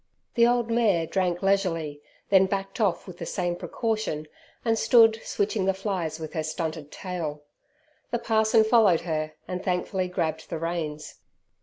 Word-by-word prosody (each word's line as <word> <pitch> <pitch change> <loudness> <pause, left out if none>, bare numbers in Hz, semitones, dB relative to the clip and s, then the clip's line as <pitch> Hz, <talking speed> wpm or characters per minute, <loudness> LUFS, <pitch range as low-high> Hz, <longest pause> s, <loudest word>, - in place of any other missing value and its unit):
The 235 0 +5
old 240 -1 +1
mare 210 -8 +3
drank 180 0 -1
leisurely, 165 -7 0 0.3
then 190 -1 +6
backed 195 +4 -3
off 195 -5 +1
with 180 -2 -11
the - - -4
same 175 -2 -1
precaution, 215 -7 -2 0.4
and 225 -1 +3
stood 225 -1 +5
switching 200 -1 -1
the 195 0 +2
flies 185 -6 -3
with 155 -1 -7
her 160 - -1
stunted 155 -1 -4
tail. 160 -6 -5 0.7
The 240 - 0
parson 220 -1 +3
followed 220 -6 +4
her 155 -2 -2
and 180 0 -4
thankfully 185 +1 -1
grabbed 160 -3 -2
the 165 - -3
reins. 155 -2 -4
185 Hz, 155 wpm, -26 LUFS, 160-215 Hz, 0.7 s, then